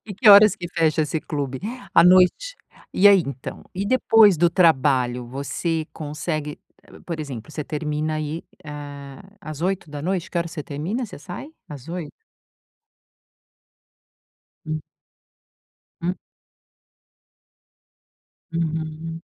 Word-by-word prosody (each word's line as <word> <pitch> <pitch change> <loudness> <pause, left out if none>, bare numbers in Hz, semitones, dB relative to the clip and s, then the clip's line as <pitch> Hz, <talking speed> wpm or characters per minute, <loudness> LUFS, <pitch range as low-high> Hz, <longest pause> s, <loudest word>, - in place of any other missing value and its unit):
E 200 - -7
que 215 +2 +3
horas 205 0 +9
que 175 - -6
fecha 160 -2 +1
esse 155 +1 -2
clube? 140 -3 -4 0.3
À - - +8
noite? 185 - +4 0.4
E 200 - +5
aí, 195 -3 +6
então? 135 -2 -7
E 195 +2 -2
depois 220 -4 +5
do 170 +2 +3
trabalho? 130 -8 +2
Você 155 +5 -3
consegue 150 0 -4 0.3
P - - -16
por 165 -3 -4
exemplo, 130 -7 -7
você 150 - -4
termina 150 +1 -2
aí, 155 +2 -4 0.2
hã, 145 0 -8 0.2
às 155 -4 -7
20h? 180 0 -2
Que - - -7
hora 170 0 0
você 155 -3 -7
termina, 170 - -3
você - - -10
sai? 180 - -8 0.2
Às 145 -2 -10
20h? 170 -3 -5 2.6
Hum. 155 0 -3 1.2
Hum. 180 +2 -1 2.4
Uhum. 160 0 -3
160 Hz, 120 wpm, -23 LUFS, 145-180 Hz, 2.6 s, horas